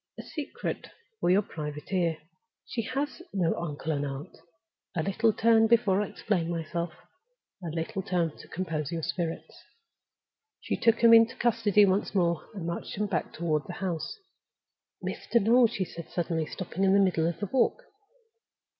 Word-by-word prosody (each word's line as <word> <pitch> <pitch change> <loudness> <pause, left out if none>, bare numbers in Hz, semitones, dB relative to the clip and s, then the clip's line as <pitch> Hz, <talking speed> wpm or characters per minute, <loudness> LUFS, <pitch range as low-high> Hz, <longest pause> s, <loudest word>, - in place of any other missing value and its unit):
"A - - -7
secret 320 - -5 0.3
for - - +1
your 195 +3 +5
private 150 0 -6
ear! 170 -4 +1 0.5
She 235 - -3
has 280 +8 -3
no 175 -4 +1
uncle 160 -1 -3
and 145 -2 -1
aunt. 140 +4 -6 0.6
Another 175 +3 0
little 225 +3 +3
turn 225 +1 +4
before 215 -4 +4
I 210 - -1
explain 180 -6 -1
myself—another 170 - -7
little 165 +4 -2
turn 175 -4 -1
to - - -13
compose 165 -5 -3
your 165 -1 -3
spirits." 170 -1 -3 1.0
She - - -2
took 230 -1 +3
him 230 0 +9
into 230 0 +6
custody 220 -4 +4
once 195 +2 0
more, 170 -3 +1
and 185 -5 -5
marched 170 0 -4
him 210 - +1
back 180 -6 -2
toward 155 -3 -1
the 180 - -5
house. 175 - -3 0.9
"Mr. 235 - 0
Noel!" 235 +3 +5
she 200 -4 -2
said, 170 -1 -9
suddenly 165 -2 -1
stopping 185 0 -4
in 190 0 +5
the 200 - +6
middle 175 -4 +3
of 170 - -3
the 205 - -1
walk. 265 - +2
185 Hz, 165 wpm, -28 LUFS, 165-220 Hz, 1.0 s, him